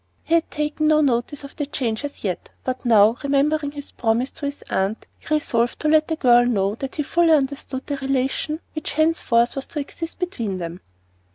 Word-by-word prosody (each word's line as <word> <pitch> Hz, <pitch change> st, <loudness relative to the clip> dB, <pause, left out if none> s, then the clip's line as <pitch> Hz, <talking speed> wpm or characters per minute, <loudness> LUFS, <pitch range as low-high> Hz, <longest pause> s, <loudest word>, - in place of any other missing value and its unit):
He 330 Hz, -, -2 dB
had 335 Hz, -1 st, +3 dB
taken 300 Hz, +1 st, -1 dB
no 305 Hz, 0 st, +5 dB
notice 270 Hz, +1 st, 0 dB
of 280 Hz, -, -10 dB
the 290 Hz, -, -3 dB
change 235 Hz, -4 st, -2 dB
as 285 Hz, 0 st, -7 dB
yet, 185 Hz, -4 st, -3 dB
but 255 Hz, 0 st, -3 dB
now, 220 Hz, 0 st, +6 dB
remembering 285 Hz, +1 st, +1 dB
his 285 Hz, -1 st, -8 dB
promise 235 Hz, +3 st, 0 dB
to 285 Hz, -, -5 dB
his 285 Hz, 0 st, -6 dB
aunt, 195 Hz, +3 st, -1 dB
he -, -, -13 dB
resolved 240 Hz, -5 st, 0 dB
to 305 Hz, -, 0 dB
let 310 Hz, 0 st, +4 dB
the 320 Hz, -, -1 dB
girl 245 Hz, -5 st, +5 dB
know 205 Hz, -5 st, +1 dB
that 265 Hz, +4 st, -6 dB
he 300 Hz, -, -1 dB
fully 340 Hz, +3 st, +2 dB
understood 275 Hz, -2 st, -1 dB
the 285 Hz, -, -3 dB
relation 270 Hz, +4 st, -1 dB
which 310 Hz, -, -4 dB
henceforth 290 Hz, -7 st, +2 dB
was 275 Hz, -, -4 dB
to 305 Hz, -, -4 dB
exist 325 Hz, +3 st, -6 dB
between 235 Hz, -, -3 dB
them. 170 Hz, 0 st, -6 dB
275 Hz, 200 wpm, -22 LUFS, 235-305 Hz, -, now